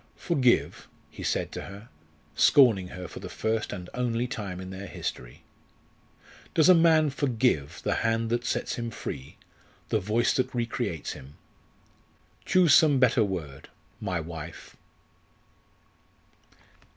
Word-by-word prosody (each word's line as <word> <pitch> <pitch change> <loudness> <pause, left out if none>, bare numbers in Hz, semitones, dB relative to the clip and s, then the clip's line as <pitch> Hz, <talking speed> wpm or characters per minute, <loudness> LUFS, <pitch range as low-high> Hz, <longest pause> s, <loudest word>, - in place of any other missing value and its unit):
"Forgive?" 130 -8 +1 0.2
he - - -10
said - - -1
to - - -6
her, 100 +4 -10 0.4
scorning 115 -10 +5
her 90 0 -8
for - - -9
the - - -8
first 110 0 -2
and 90 -3 -6
only 120 -1 -1
time 105 -7 -5
in 95 0 -7
their 95 +1 -7
history. - - -6 1.1
"Does 160 - +5
a - - +10
man 160 -3 +4
forgive 125 - 0
the - - +1
hand 115 0 0
that 120 0 0
sets - - -2
him 120 -1 -3
free, 65 - -7 0.5
the 110 - +2
voice 110 +4 +1
that 130 - -1
recreates 115 - -2
him? 70 +2 -11 1.1
Choose 180 -5 +4
some 150 -4 +6
better 125 -3 +4
word 80 -9 -5 0.3
my 95 -4 -2
wife!" 80 -1 -8
115 Hz, 130 wpm, -27 LUFS, 90-125 Hz, 1.1 s, a